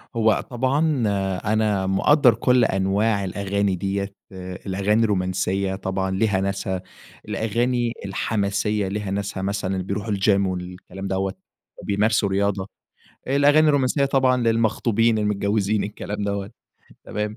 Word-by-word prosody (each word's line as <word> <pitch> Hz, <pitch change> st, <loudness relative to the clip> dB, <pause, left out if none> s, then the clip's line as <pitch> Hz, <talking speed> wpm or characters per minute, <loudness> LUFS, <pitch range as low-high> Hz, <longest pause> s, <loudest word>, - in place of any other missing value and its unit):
هو 110 Hz, -2 st, +3 dB
طبعًا 135 Hz, +3 st, +1 dB, 0.4 s
أنا 105 Hz, -3 st, +1 dB
مقدر 125 Hz, +6 st, +4 dB
كل 125 Hz, +1 st, +3 dB
أنواع 100 Hz, +2 st, +1 dB
الأغاني 100 Hz, +1 st, -1 dB
ديّة، 100 Hz, +2 st, -3 dB, 0.5 s
الأغاني 100 Hz, +3 st, +1 dB
الرومانسيّة 95 Hz, -1 st, 0 dB
طبعًا 95 Hz, 0 st, -2 dB
ليها 95 Hz, 0 st, +1 dB
ناسها، 95 Hz, -1 st, -2 dB, 0.5 s
الأغاني 120 Hz, +3 st, 0 dB
الحماسية 100 Hz, +1 st, -1 dB
ليها 100 Hz, 0 st, -3 dB
ناسها 100 Hz, -1 st, -3 dB
مثلًا 95 Hz, -1 st, -2 dB
بيروحوا 100 Hz, +3 st, -3 dB
الgym 100 Hz, 0 st, +3 dB
والكلام 90 Hz, +1 st, -6 dB
دوّة، 95 Hz, 0 st, -1 dB, 0.5 s
بيمارسوا 105 Hz, 0 st, +1 dB
رياضة. 100 Hz, 0 st, 0 dB, 0.6 s
الأغاني 145 Hz, +3 st, +4 dB
الرومانسيّة 140 Hz, -1 st, +2 dB
طبعًا 130 Hz, -2 st, +3 dB
للمخطوبين 115 Hz, -1 st, +2 dB
المتجوزين 105 Hz, 0 st, 0 dB
الكلام 105 Hz, 0 st, -5 dB
دَوَّة 100 Hz, 0 st, -3 dB, 0.5 s
تمام؟ 105 Hz, +1 st, -4 dB
100 Hz, 110 wpm, -23 LUFS, 95-115 Hz, 0.6 s, مقدر